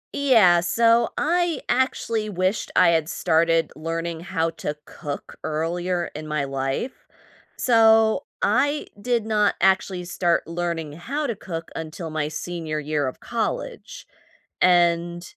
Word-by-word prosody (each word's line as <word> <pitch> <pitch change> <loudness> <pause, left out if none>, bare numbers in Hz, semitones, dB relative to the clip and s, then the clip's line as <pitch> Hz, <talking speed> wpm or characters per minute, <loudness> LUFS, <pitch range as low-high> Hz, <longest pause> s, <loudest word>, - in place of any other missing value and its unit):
Yeah, 225 -11 +5
so 230 +6 +3
I 345 +1 +1
actually 230 -3 0
wished 185 +1 -1
I - - +6
had 160 -2 +1
started 165 -1 +2
learning 165 +1 -4
how 165 -1 -1
to 150 -2 -4
cook 145 -4 -7
earlier 175 +3 -2
in 155 0 -6
my 150 -2 -1
life. 135 - -2 0.7
So, 225 -2 +4 0.2
I 285 +8 +2
did 240 -1 0
not 210 -2 +2
actually 190 -1 +2
start 175 -1 0
learning 170 -2 -3
how 275 - -3
to 235 - -2
cook 165 -4 -7
until 160 +1 -6
my 155 -1 -1
senior 160 0 -4
year 150 -1 -1
of 130 - -6
college, - - -4 0.6
and 175 -1 +3
175 Hz, 130 wpm, -23 LUFS, 160-220 Hz, 0.7 s, I